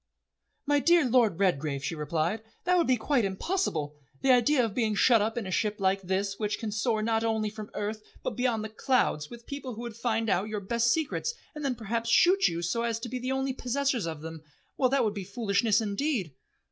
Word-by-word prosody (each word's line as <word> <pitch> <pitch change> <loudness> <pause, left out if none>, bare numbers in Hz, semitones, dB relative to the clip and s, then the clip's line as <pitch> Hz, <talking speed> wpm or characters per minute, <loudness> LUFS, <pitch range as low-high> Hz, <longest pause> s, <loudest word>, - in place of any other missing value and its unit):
"My 290 0 +3
dear 340 0 +4
Lord 230 -8 +3
Redgrave," 150 -7 0
she 145 - -2
replied, 165 +6 -1 0.2
"that 360 +1 +3
would 345 -2 +3
be 255 -1 +3
quite 245 +2 +1
impossible. 190 - -2 0.2
The 265 - +4
idea 250 +1 +4
of 220 - -4
being 220 -3 0
shut 230 +1 +5
up 220 +3 -1
in 230 - -2
a 185 - -5
ship 210 +2 0
like 195 0 +1
this 195 +1 -2
which 210 -1 -1
can 220 -2 -4
soar 215 +1 0
not 225 0 +1
only 220 -2 0
from 215 -1 -8
earth, 210 +1 -3 0.2
but - - -1
beyond 245 -3 0
the 220 - -5
clouds, 220 - 0
with 235 0 -11
people 280 -4 -6
who 230 - -7
would 235 -2 -6
find 225 -1 -1
out 195 0 +1
your 215 -1 -2
best 235 +4 0
secrets 325 - -1 0.2
and 300 - -7
then 270 -3 0
perhaps 230 +1 -3
shoot 370 +10 +5
you 170 +1 -3
so 175 +7 0
as 230 -1 -1
to 240 - -5
be 255 +2 -3
the 255 +1 -3
only 265 0 -1
possessors 255 -5 -1
of 160 -2 -5
them 160 0 -7 0.3
well, 255 - +2
that 270 -1 +2
would 210 - 0
be 200 -2 -5
foolishness 205 +1 +1
indeed." 210 - -1
225 Hz, 225 wpm, -28 LUFS, 200-255 Hz, 0.3 s, shut